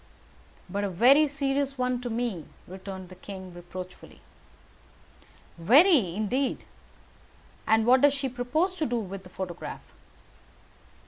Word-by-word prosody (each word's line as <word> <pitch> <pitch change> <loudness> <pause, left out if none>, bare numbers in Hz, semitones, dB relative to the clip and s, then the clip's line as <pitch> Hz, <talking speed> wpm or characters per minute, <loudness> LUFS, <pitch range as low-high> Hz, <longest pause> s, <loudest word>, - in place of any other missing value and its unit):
"But 200 +1 -3
a 200 - -1
very 255 - +5
serious 275 -1 -1
one 250 -1 -1
to 245 - -4
me," 225 -8 -3 0.2
returned 190 0 -8
the 185 - -11
king, 185 -1 -9
reproachfully. 180 +1 -10 1.4
"Very, 245 - +5
indeed. 250 +6 -1 1.0
And 220 0 +4
what 255 +2 +5
does 285 0 +5
she 275 -1 -2
propose 260 +9 -1
to 310 - 0
do 240 - -1
with 195 -3 -5
the 180 - -14
photograph?" 180 -2 -7
235 Hz, 125 wpm, -27 LUFS, 190-275 Hz, 1.4 s, very